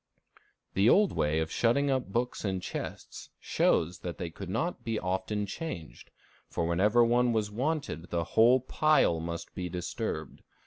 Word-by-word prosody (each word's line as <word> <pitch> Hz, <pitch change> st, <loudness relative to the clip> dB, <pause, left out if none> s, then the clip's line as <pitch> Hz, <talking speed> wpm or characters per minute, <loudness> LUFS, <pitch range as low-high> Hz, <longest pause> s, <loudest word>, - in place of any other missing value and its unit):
The 100 Hz, +4 st, +4 dB
old 205 Hz, +5 st, +5 dB
way 75 Hz, +1 st, 0 dB
of 80 Hz, -, -3 dB
shutting 140 Hz, +4 st, +2 dB
up 130 Hz, -6 st, -1 dB
books 120 Hz, +3 st, -1 dB
in 95 Hz, -3 st, -1 dB
chests -, -, -7 dB
shows 85 Hz, +1 st, +1 dB
that 85 Hz, 0 st, -6 dB
they 85 Hz, -2 st, -5 dB
could 85 Hz, -, -8 dB
not 170 Hz, -, -2 dB
be 115 Hz, -1 st, -1 dB
often 95 Hz, +3 st, -2 dB
changed, 95 Hz, -, -7 dB, 0.4 s
for 85 Hz, -, -1 dB
whenever 105 Hz, +8 st, +4 dB
one 120 Hz, +1 st, +3 dB
was 105 Hz, -2 st, 0 dB
wanted 135 Hz, -, -2 dB
the 85 Hz, -1 st, 0 dB
whole 120 Hz, +8 st, +4 dB
pile 150 Hz, -, +3 dB
must 85 Hz, +1 st, -5 dB
be 90 Hz, -1 st, -4 dB
disturbed. 90 Hz, -, -4 dB
105 Hz, 160 wpm, -29 LUFS, 85-125 Hz, 0.4 s, old